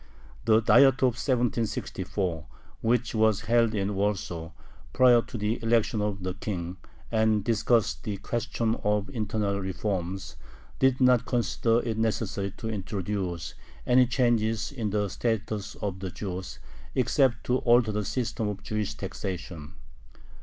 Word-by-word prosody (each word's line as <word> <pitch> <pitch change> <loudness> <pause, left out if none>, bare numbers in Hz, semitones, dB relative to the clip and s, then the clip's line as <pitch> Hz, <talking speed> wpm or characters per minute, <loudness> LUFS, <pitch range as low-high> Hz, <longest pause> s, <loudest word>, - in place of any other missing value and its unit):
The 110 0 +5
Diet 135 +4 +5
of 125 -2 +4
1764, 110 - -1 0.3
which 120 +1 +1
was 110 -2 +3
held 115 -1 +2
in 100 0 -1
Warsaw 95 -5 -2 0.4
prior 125 -2 +6
to 120 - -8
the 105 +3 -1
election 115 -1 +2
of 100 -2 -2
the 95 0 -2
King, 90 -2 -4 0.3
and 110 -2 +2
discussed 115 +1 +1
the 105 -2 -3
question 115 +1 -1
of 105 -1 0
internal 105 -4 -1
reforms, 95 -3 -3 0.4
did 130 0 +3
not 125 -1 +4
consider 120 -1 +1
it 110 -1 -2
necessary 110 -3 -1
to 110 - -5
introduce 95 -4 -3 0.3
any 125 0 +5
changes 115 -3 +1
in 115 -7 -3
the 105 0 0
status 110 0 -2
of 95 -2 -4
the 95 0 -4
Jews, 95 0 -6 0.4
except 130 0 +2
to 125 - +1
alter 120 -2 +4
the 105 0 -1
system 115 -1 -2
of 105 0 -5
Jewish 105 -2 -2
taxation. 85 -5 -6
110 Hz, 135 wpm, -27 LUFS, 100-120 Hz, 0.4 s, prior